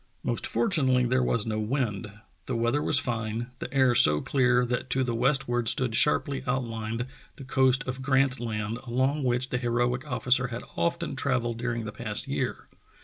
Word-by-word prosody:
Most - - -1
fortunately 135 - +2
there 130 +1 +1
was 115 -3 0
no 110 -1 -2
wind, 110 -3 -2 0.4
the 130 - -2
weather 120 +5 0
was 150 - +2
fine, 115 -2 -2
the - - -6
air 130 -2 +3
so 75 -9 +7
clear 125 - +2
that 125 +1 -3
to 130 - +2
the 120 -2 -2
westward 120 -1 +1
stood 125 -3 +3
sharply 140 +2 +2
outlined 115 -2 -2 0.3
the - - -10
coast 130 -1 +2
of 130 +1 -4
Grant 135 0 +1
Land 110 -1 -4
along 130 +5 0
which 125 +1 0
the 125 - -1
heroic 120 +2 -1
officer 125 0 +1
had 120 -1 -6
often 170 -2 -1
travelled 125 -4 -1
during 120 -1 -3
the 105 - -5
past 105 -1 -4
year. - - -3
125 Hz, 175 wpm, -27 LUFS, 115-130 Hz, 0.4 s, so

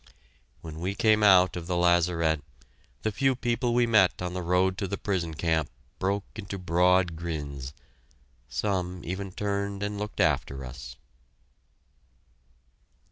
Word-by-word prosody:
When 80 -1 -8
we 95 +4 -2
came 110 0 +3
out 95 -3 +6
of 85 -1 -6
the 90 -1 -1
lazaret, 85 -3 +2 0.6
the 110 - 0
few 135 +4 +1
people 120 0 0
we 120 0 +4
met 105 -6 +4
on 90 0 -3
the 90 - -3
road 90 +2 +2
to 100 - -1
the 100 +1 -3
prison 85 -5 -2
camp 80 -1 0 0.3
broke 100 +1 0
into 100 -2 -6
broad 90 0 +2
grins; 75 -5 -5 0.8
some 90 -3 -2
even 95 +2 -4
turned 100 0 -2
and 105 0 -3
looked 105 -1 -5
after 70 -4 +1
us. - - -9
90 Hz, 135 wpm, -27 LUFS, 85-100 Hz, 0.8 s, out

